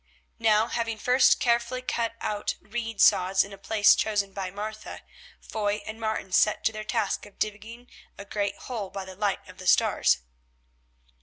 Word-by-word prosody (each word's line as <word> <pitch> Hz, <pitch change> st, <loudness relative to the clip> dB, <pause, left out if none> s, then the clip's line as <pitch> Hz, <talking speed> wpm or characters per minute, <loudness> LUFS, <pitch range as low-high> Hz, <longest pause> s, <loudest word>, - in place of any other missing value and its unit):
Now, 220 Hz, -1 st, +4 dB
having 230 Hz, -1 st, -2 dB
first 250 Hz, +4 st, +4 dB
carefully 240 Hz, +1 st, 0 dB
cut 230 Hz, -2 st, -2 dB
out 210 Hz, -1 st, -2 dB
reed 225 Hz, -1 st, -5 dB
sods 190 Hz, -1 st, +5 dB
in 200 Hz, -, -10 dB
a -, -, -10 dB
place 210 Hz, +1 st, +5 dB
chosen 205 Hz, -3 st, 0 dB
by 190 Hz, -2 st, -4 dB
Martha, 215 Hz, +3 st, -7 dB, 0.4 s
Foy 210 Hz, -1 st, -2 dB
and 220 Hz, +1 st, -7 dB
Martin 220 Hz, -3 st, -3 dB
set 210 Hz, -, +3 dB
to -, -, +2 dB
their 215 Hz, 0 st, -5 dB
task 210 Hz, -1 st, -1 dB
of 205 Hz, -, -20 dB
digging 220 Hz, +3 st, -5 dB, 0.3 s
a 200 Hz, -, -9 dB
great 200 Hz, 0 st, -2 dB
hole 220 Hz, -6 st, -4 dB
by 195 Hz, 0 st, -6 dB
the 190 Hz, 0 st, -10 dB
light 205 Hz, 0 st, -2 dB
of -, -, -14 dB
the -, -, -7 dB
stars. 65 Hz, -, +3 dB
215 Hz, 170 wpm, -27 LUFS, 200-225 Hz, 0.4 s, sods